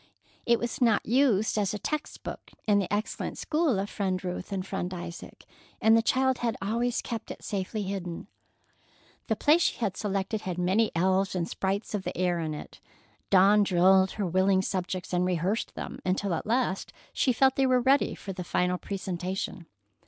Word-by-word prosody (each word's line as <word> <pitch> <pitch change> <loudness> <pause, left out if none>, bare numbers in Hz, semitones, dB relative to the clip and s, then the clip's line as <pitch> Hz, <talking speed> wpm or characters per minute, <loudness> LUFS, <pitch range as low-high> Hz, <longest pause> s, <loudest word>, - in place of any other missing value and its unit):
It 235 0 +5
was 240 +2 -4
not 230 -4 +3
used 225 -4 +2
as 205 0 0
a - - -2
text 305 +8 -4
book - - -7 0.2
in 205 -2 +4
the 190 - -2
excellent 210 +2 -2
school 310 - +1
of 195 +1 -1
Friend 190 -3 -2
Ruth 180 +2 -5
and 190 -2 -2
Friend 190 -2 -3
Isaac, 170 0 -9 0.3
and 225 -1 +5
the 225 - +5
child 260 +2 +2
had 235 -2 -1
always 235 +4 -1
kept 230 -2 -5
it - - -8
safely 205 +1 -3
hidden. 185 -3 -4 1.0
The - - +1
play 305 +3 +4
she - - +1
had 205 -6 -1
selected 200 +1 -2
had 180 -3 -4
many 190 +5 +2
elves 190 +3 +2
and 170 -2 -1
sprites 195 +4 -2
of 205 - -1
the - - -5
air 180 -1 +1
in 155 -2 -3
it. - - -10 0.5
Dawn 200 +2 +6
drilled 190 0 +4
her 205 - -2
willing 190 +2 +2
subjects, 185 -1 -3
and 180 0 +2
rehearsed 180 +4 -1
them, - - -6
until 185 +1 0
at 165 - -3
last 230 -4 0 0.2
she 260 - +2
felt 265 +2 +3
they 270 -1 +3
were 255 -1 +4
ready 265 +3 +3
for 195 - -7
the 180 -1 -5
final 180 +1 0
presentation. 185 -2 -4
195 Hz, 185 wpm, -28 LUFS, 185-225 Hz, 1.0 s, Dawn